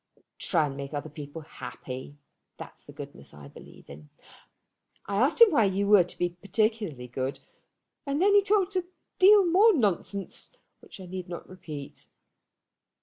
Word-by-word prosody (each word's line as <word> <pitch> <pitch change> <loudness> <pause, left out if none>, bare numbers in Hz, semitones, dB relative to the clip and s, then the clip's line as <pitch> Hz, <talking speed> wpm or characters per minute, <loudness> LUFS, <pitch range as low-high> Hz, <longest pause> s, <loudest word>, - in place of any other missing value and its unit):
Try 165 -4 +2
and 140 -2 -5
make 140 +1 -6
other 145 +1 -5
people 150 +1 -8
happy. 130 0 -9 0.4
That's - - -12
the - - -12
goodness 70 +1 -11
I 70 -1 -12
believe - - -15
in. 75 +1 -13 1.0
I 200 0 -3
asked 265 - +2
him 465 -3 +8
why 230 -9 +4
you 195 +1 0
were 200 -2 +6
to - - -10
be 175 - 0
particularly 195 - -2
good, 130 +2 -4 0.7
and 280 +1 -1
then 400 +3 +4
he 405 - +7
talked 400 -1 +1
a 365 - +1 0.4
deal 400 +1 +7
more 390 +5 +5
nonsense, 200 - -1 0.3
which - - -14
I 190 - -9
need 180 0 -7
not 175 - -7
repeat. 155 -6 -10
185 Hz, 160 wpm, -27 LUFS, -, 1.0 s, him